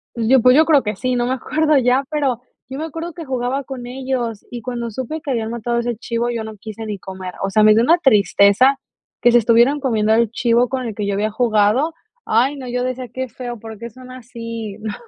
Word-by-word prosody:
Pues 230 -2 -1
yo 265 -1 +6
pues 250 +2 +6
yo 310 - +7
creo 310 -3 +4
que 210 -3 -3
sí, 255 +4 -1
no 240 - 0
me 255 - 0
acuerdo 305 +3 +1
ya, 255 +1 +2
pero 280 -6 0 0.3
yo 265 - -6
me 315 - -3
acuerdo 330 +2 -6
que 330 -1 -9
jugaba 260 +1 -2
con 255 -2 -7
ellos, 250 -3 -4
y 240 -1 -7
cuando 235 0 -4
supe 260 +7 -5
que 295 - -8
habían 225 -3 -2
matado 235 0 -2
ese 235 -1 -2
chivo, 235 +1 -2
yo 230 -2 -3
no 220 0 -8
quise 215 +1 -8
ni 210 -2 -4
comer, 190 -1 -8
o 195 - 0
sea, 215 +2 +3
me 215 0 +7
dio 225 +2 +3
una 330 +7 +5
tristeza 245 - +4 0.4
que 240 - +4
se 240 - +7
estuvieran 235 +5 +3
comiendo 220 -5 +1
el 230 -1 +2
chivo 240 0 +2
con 260 -1 -3
el 225 -3 -5
que 210 - -3
yo 200 0 -1
había 215 +2 -1
jugado, 225 +6 +2 0.3
ay, 255 +6 +2
no, 270 -2 -8
yo 245 +1 -1
decía: 255 -1 -4
"Qué 260 +1 -3
feo, 240 -1 -7
¿por 220 0 -9
qué 235 +2 -7
son 255 +3 -14
así?" 230 -4 -7
No. 215 -1 -5
240 Hz, 245 wpm, -19 LUFS, 220-260 Hz, 0.4 s, yo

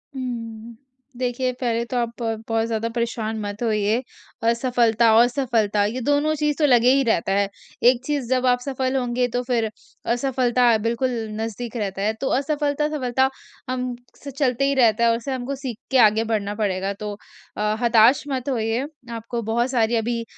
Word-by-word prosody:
हुँ। 230 -3 -6 0.4
देखिए 255 0 -1
पहले 235 -2 -1
तो 250 - -3
आप 235 -1 0
ब 225 -1 -2
बहुत 225 0 +1
ज़्यादा 230 0 -2
परेशान 230 -2 -2
मत 205 0 -5
होइए 215 +1 +1 0.5
असफलता 235 -2 +3
और 235 +2 +7
सफलता 230 -5 +1
ये 235 +5 -3
दोनों 290 +4 +2
चीज़ 300 -1 0
तो 305 - +4
लगे 250 -2 +5
ही 275 0 +3
रहता 195 -2 +1
है। 200 0 +2 0.4
एक 250 0 0
चीज़ 285 -4 -2
जब 255 0 +1
आप 245 -1 +3
सफल 260 0 -2
होंगे 245 -1 0
तो 245 - +1
फ़िर 230 -3 +1 0.4
असफलता 245 -2 +2
बिल्कुल 235 +4 -1 0.3
नज़दीक 230 +2 -5
रहता 195 -3 -3
है, 215 +2 +1
तो 245 +5 -4
असफलता-सफलता 285 -2 0 0.4
हम 255 -1 -2 0.3
से 280 - -6
चलते 270 -1 0
ही 280 - +2
रहता 235 -3 +4
है 235 - +5
और 230 - +2
उसे 240 +4 -5
हमको 260 +2 -3
सीख 260 -5 -6
के 265 - +4
आगे 215 +1 +3
बढ़ना 210 -2 -2
पड़ेगा। 195 -2 -1
तो 210 +1 -6 0.4
अ, 210 0 0
हताश 235 +2 +5
मत 265 -1 -3
होइए 230 0 -1 0.3
आपको 230 +1 -4
बहुत 235 +2 +1
सारी 235 -2 +2
अभी 230 +1 -1
235 Hz, 175 wpm, -23 LUFS, 225-255 Hz, 0.5 s, और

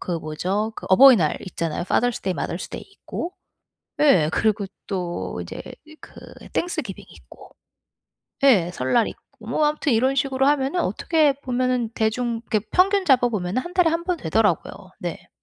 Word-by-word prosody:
그 180 - -4
뭐죠? 185 +7 -2
그 - - -9
어버이날 190 - +6
있잖아요. 170 -2 -3
Father's 245 +5 0
Day, 190 -1 -1
Mother's - - -4
Day - - -7
있고 360 -2 -6 0.7
예. 185 - +4
그리고 215 0 +1 0.2
또 175 - -4
이제 85 - -7 0.4
그 - - -14 0.4
Thanksgiving 310 - -4
있고 - - -16 0.9
예 190 -11 +5
설날 180 - +1
있고. - - -10 0.3
뭐 305 - 0
아무튼 300 -2 0
이런 260 +4 +2
식으로 270 -1 +1
하면은 285 +4 +1
어떻게 310 -4 +2
보면은 250 -2 0
대중 230 +1 -1
이렇게 215 -1 +1
평균 390 +1 +3
잡아 255 -6 +4
보면은 205 +1 -2
1 355 +1 -9
달에 360 -3 +4
1 335 +1 -2
번 360 -1 0
되더라고요. - - +1 0.3
네. - - -6
245 Hz, 390 characters per minute, -23 LUFS, 190-290 Hz, 0.9 s, 어버이날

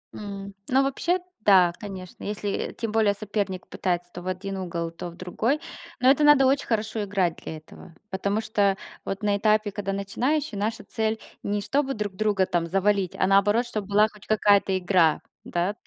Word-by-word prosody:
М, 200 -1 -7 0.2
ну, 265 +1 +4
вообще, 340 +7 0 0.2
да, 185 -4 +6
конечно. 190 -4 -8
Если 205 -1 -3
тем 230 -2 -3
более 215 -2 +3
соперник 200 -2 -3
пытается 175 -1 -2
то 175 - -7
в 180 - -9
один 190 +1 -3
угол, 170 -2 -3
то 170 +1 -7
в 170 - -13
другой. 220 - -1 0.4
Но 255 +1 +5
это 285 +2 +4
надо 295 -2 +7
очень 270 +1 +2
хорошо 220 -2 -1
играть 190 -4 0
для 160 - -7
этого, 155 +1 -14 0.2
потому 200 +2 0
что 205 -3 +1 0.3
вот 195 +2 -4
на 205 -1 +2
этапе, 215 0 +2
когда 195 -1 -3
начинающий, 245 +6 -1
наша 220 +3 -2
цель- 220 0 -2 0.2
не 205 0 -1
чтобы 275 +4 0
друг 210 -2 -3
друга 205 -2 +2
там 170 -2 -1
завалить, 195 +1 +1
а - - +2
наоборот, 205 +5 +4
чтоб 215 -4 -4
была 210 +2 +4
хоть 210 -1 -17
какая-то 205 -2 +3
игра, 180 -4 +3 0.2
да, 175 +4 -1
205 Hz, 180 wpm, -25 LUFS, 190-220 Hz, 0.4 s, надо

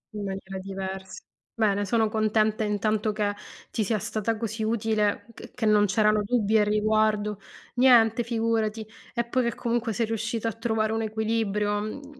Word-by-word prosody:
In 210 - -4
maniera 195 0 -5
diversa. 190 0 -6 0.3
Bene, 205 -2 +1
sono 225 +1 +2
contenta 215 0 +1
intanto 215 +1 0
che 210 -1 -1 0.4
ti 220 - 0
sia 215 +2 0
stata 220 +2 -2
così 220 0 -4
utile, 215 -2 0
che - - -12
che 245 - -3
non 210 -1 +5
c'erano 215 +1 +3
dubbi 220 -1 +2
al 210 - +3
riguardo 210 0 +1 0.4
niente, 240 -2 +5
figurati. 225 -2 -1 0.3
E 235 - 0
poi 250 +1 0
che 235 - -1
comunque 235 -1 -1
sei 230 +3 0
riuscita 225 +1 -2
a 225 - -1
trovare 220 -1 -1
un 225 - -1
equilibrio, 215 -2 0
mhmm, 275 +6 -8
215 Hz, 160 wpm, -26 LUFS, 210-225 Hz, 0.4 s, non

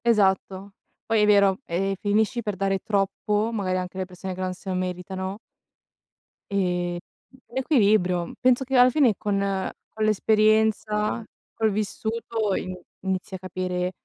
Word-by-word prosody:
Esatto. 195 -3 +2 0.3
Poi 225 -1 +2
è - - +5
vero 200 -2 +5
e 195 +3 -1
finisci 220 +4 +1
per 210 -3 -3
dare 195 0 0
troppo, 210 +2 0
magari 185 -4 -1
anche 180 0 -5
alle 190 - -1
persone 185 +1 -7
che 185 - -6
non 185 0 -1
se 190 +2 -9
lo 185 - -1
meritano 185 +1 -3 1.1
ehm, 180 -3 0 0.6
l'equilibrio. 210 - +2
Penso 255 +1 +3
che 265 +1 -2
alla 250 0 +7
fine 255 -4 +4
con 205 -1 -1 0.5
con 215 0 -1
l'esperienza, 215 +1 +2 0.3
col 220 -1 +1
vissuto 220 +1 -2
ini 185 0 -4 0.2
inizi 190 0 -3
a - - -7
capire 180 0 -2
200 Hz, 140 wpm, -25 LUFS, 185-220 Hz, 1.1 s, alla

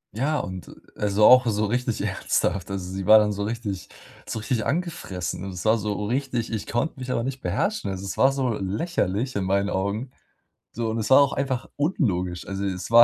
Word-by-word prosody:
Ja, 145 +7 +1
und 95 -8 -5 0.3
also, 105 0 +2
auch 125 +1 +8
so 105 -1 +1
richtig 120 +1 -1
ernsthaft. 95 -1 0
Also, 95 -2 -4
sie 95 -1 -4
war 110 - +10
dann 105 -1 +3
so 100 0 -3
richtig 105 -4 -4 0.4
so - - -3
richtig 110 +1 -1
angefressen. 140 - -3
Und 95 - -5
es 90 - -6
war 110 +1 +4
so 105 0 -2
richtig 125 0 -1
ich 105 -2 -3
konnte 125 +5 -1
mich 130 0 -6
aber 115 -2 0
nicht 130 +1 -4
beherrschen. 215 - -1
Also, 95 0 -5
es 95 - -4
war 135 - +5
so 135 -2 0
lächerlich 105 - -1
in 100 - 0
meinen 100 +1 +1
Augen. 100 +7 -2 0.6
So, 115 0 -2
und 110 - -2
es 110 +1 -2
war 130 - +9
auch 140 -1 +3
einfach 135 -3 -2
unlogisch. 95 - -1
Also, 100 0 -3
es 95 -2 -3
war 120 +1 +9
110 Hz, 205 wpm, -25 LUFS, 100-125 Hz, 0.6 s, war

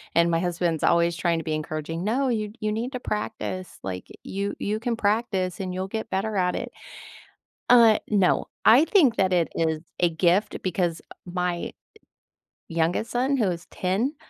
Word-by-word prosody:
And 170 0 +4
my 165 - +2
husband's 170 -2 -1
always 170 0 +3
trying 170 0 +1
to 160 - -6
be 155 - -1
encouraging. 155 +2 -4
"No. 255 +5 +1
You 215 -3 -1
you 215 0 -1
need 230 +4 -2
to 250 - -3
practice, 210 -5 -4
like, 90 -1 -5 0.2
you 200 +1 -3
you 210 +1 -1
can 235 0 -1
practice, 205 -4 0
and 185 -2 -3
you'll 185 +1 -3
get 220 +2 -4
better 205 +2 -1
at 180 -1 +1
it." - - -4 1.0
Uh, 230 -3 +7
no. 195 -4 +2 0.2
I 255 +8 +7
think 305 - +4
that 190 -3 +2
it 170 -2 +3
is 160 -1 0 0.2
a 175 - +4
gift 175 +5 +1
because 175 -2 -1 0.2
my 180 -1 -2 1.0
youngest 165 +6 0
son 265 +3 +1
who 225 - +2
is 170 0 -6
10, 205 - -1
185 Hz, 170 wpm, -25 LUFS, 170-220 Hz, 1.0 s, Uh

